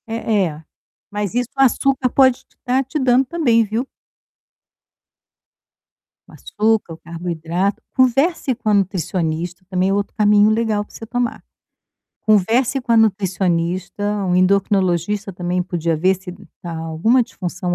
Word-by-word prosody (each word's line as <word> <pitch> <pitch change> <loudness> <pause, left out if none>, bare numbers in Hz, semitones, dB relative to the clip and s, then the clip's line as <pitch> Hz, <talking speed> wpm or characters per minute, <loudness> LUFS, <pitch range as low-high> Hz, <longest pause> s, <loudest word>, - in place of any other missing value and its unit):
Eh 225 -3 0
eh, 155 0 -9 0.5
mas 205 -1 -3
isso 245 -1 0
o - - +2
açúcar 270 0 +2
pode 260 -1 +4
te - - -35
tá 260 +1 +1
te 265 +4 -5
dando 260 0 +3
também, 250 -7 +2
viu? 225 +5 -3 2.4
O - - -17
açúcar, 215 -4 -1
o - - -10
carboidrato. 170 +3 -3
Converse 265 +3 +2
com 225 -2 -3
a - - +3
nutricionista, 180 -2 -1
também 185 0 +1
é - - +1
outro 200 0 -2
caminho 210 0 +4
legal 220 -1 0
para - - -22
você 225 - -8
tomar. 245 +1 -3 0.8
Converse 225 +6 +2
com 245 -2 -1
a - - +5
nutricionista, 185 -3 0 0.2
um 180 -1 +1
endocrinologista 195 +1 +1
também 180 0 -2
podia 170 -2 -2
ver 185 +5 +2
se 185 -1 -9 0.3
tá 170 -2 -5
alguma 165 +10 +1
disfunção 180 -4 -4
205 Hz, 140 wpm, -19 LUFS, 180-235 Hz, 2.4 s, a